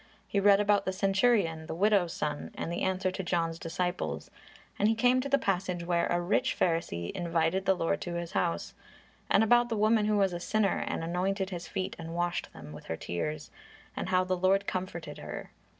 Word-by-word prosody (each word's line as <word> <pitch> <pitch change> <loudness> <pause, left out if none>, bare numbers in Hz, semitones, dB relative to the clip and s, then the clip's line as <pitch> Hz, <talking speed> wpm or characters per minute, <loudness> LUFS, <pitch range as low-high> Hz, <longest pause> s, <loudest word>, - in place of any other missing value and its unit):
He 200 - 0
read 200 0 +6
about 205 -1 +3
the 190 - -1
centurion, 195 -4 +2
the - - -4
widow's 195 -2 +3
son, 150 -1 -3
and 165 - -4
the 170 - -3
answer 190 0 0
to 190 - -4
John's 165 -2 -1
disciples, 175 +1 -3 0.5
and 205 - +4
he 225 - +2
came 250 +2 +3
to 280 - -4
the 280 - +4
passage 185 -7 -1
where 170 -1 +1
a 175 - +1
rich 175 +3 +1
Pharisee 165 - 0
invited 170 +2 0
the 190 - +5
Lord 165 -2 -1
to 175 -1 -4
his 170 -1 -4
house; 85 -3 -1 0.6
and 200 - +5
about 240 +2 +4
the 225 - -1
woman 215 0 +3
who 210 -1 +2
was 195 -2 +2
a 175 - -3
sinner 200 +2 +1
and - - -2
anointed 190 +3 -1
His 175 -2 -5
feet 185 - -3
and 165 0 -6
washed 175 0 -1
them 75 -1 -11
with 80 - -11
her 80 - -4
tears, 150 - -4 0.4
and - - -3
how 185 0 +3
the 185 0 0
Lord 190 +2 +2
comforted 175 -6 -4
her. - - -7
185 Hz, 205 wpm, -30 LUFS, 170-200 Hz, 0.6 s, read